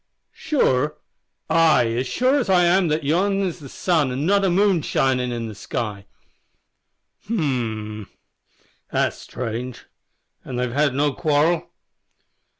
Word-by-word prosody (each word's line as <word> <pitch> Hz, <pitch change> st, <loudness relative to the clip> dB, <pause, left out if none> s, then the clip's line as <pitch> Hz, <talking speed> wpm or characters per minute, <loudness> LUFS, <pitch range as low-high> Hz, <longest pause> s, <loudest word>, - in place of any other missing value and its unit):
"Sure? 150 Hz, -, 0 dB, 0.5 s
Ay, 155 Hz, -8 st, +4 dB
as 125 Hz, +2 st, -1 dB
sure 260 Hz, -, +2 dB
as 245 Hz, -, -2 dB
I 180 Hz, -2 st, +5 dB
am 175 Hz, +1 st, +3 dB
that 155 Hz, 0 st, 0 dB
yon 195 Hz, +7 st, +1 dB
is 180 Hz, -3 st, -2 dB
the 140 Hz, -3 st, -10 dB
sun 160 Hz, -6 st, 0 dB
an' 135 Hz, +4 st, -2 dB
not 200 Hz, +3 st, +3 dB
the 195 Hz, -, +2 dB
moon 195 Hz, +1 st, +3 dB
a -, -, -2 dB
shinin' 125 Hz, -3 st, 0 dB
in 115 Hz, -1 st, -3 dB
the 110 Hz, -, -7 dB
sky." 105 Hz, -1 st, -5 dB, 1.2 s
"H'm! 115 Hz, -, -2 dB, 0.8 s
that's -, -, 0 dB
strange. 125 Hz, +1 st, -6 dB, 0.6 s
An' 130 Hz, -, -7 dB
they've 125 Hz, -1 st, -2 dB
had 145 Hz, -1 st, +1 dB
no 145 Hz, 0 st, +1 dB
quarrel?" 155 Hz, +4 st, +1 dB
145 Hz, 140 wpm, -22 LUFS, 125-175 Hz, 1.2 s, I